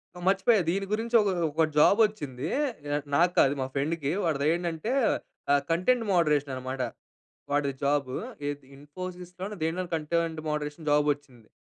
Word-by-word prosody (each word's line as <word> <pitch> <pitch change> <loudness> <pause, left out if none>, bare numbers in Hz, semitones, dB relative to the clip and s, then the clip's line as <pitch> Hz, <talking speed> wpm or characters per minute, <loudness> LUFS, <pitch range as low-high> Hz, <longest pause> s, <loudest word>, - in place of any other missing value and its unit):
హ్మ్, 175 - -9
మర్చిపోయా. 195 +2 +4
దీని 195 +2 -1
గురించి 230 +2 -1
ఒక 200 - +1 0.2
ఒక 160 +2 +2 0.2
జాబ్ 200 +8 +6
వచ్చింది. 145 -9 -6 0.7
నాకు 175 +1 +4
కాదు 135 - +5
మా 130 - -3
ఫెండ్‌కి. 145 0 -1
వాడిదేంటంటే, 165 - 0 0.6
ఆహ్, 145 0 +4
కంటెంట్ 225 +8 +2
మోడరేషన్ 150 -5 +2
అనమాట 130 +1 -4 0.7
వాడిది 140 -1 +1
జాబ్. 140 -2 +1 0.4
ఏద్ 145 -1 -5
ఇన్ఫోసిస్‌లోనో 180 +6 -7
దేంట్లోనో, 175 +3 -2
కంటెంట్ 160 0 -1
మోడరేషన్ 150 +1 -4
జాబ్ 150 0 +3
వచ్చింది. 125 -6 -21
160 Hz, 135 wpm, -28 LUFS, 145-180 Hz, 0.7 s, జాబ్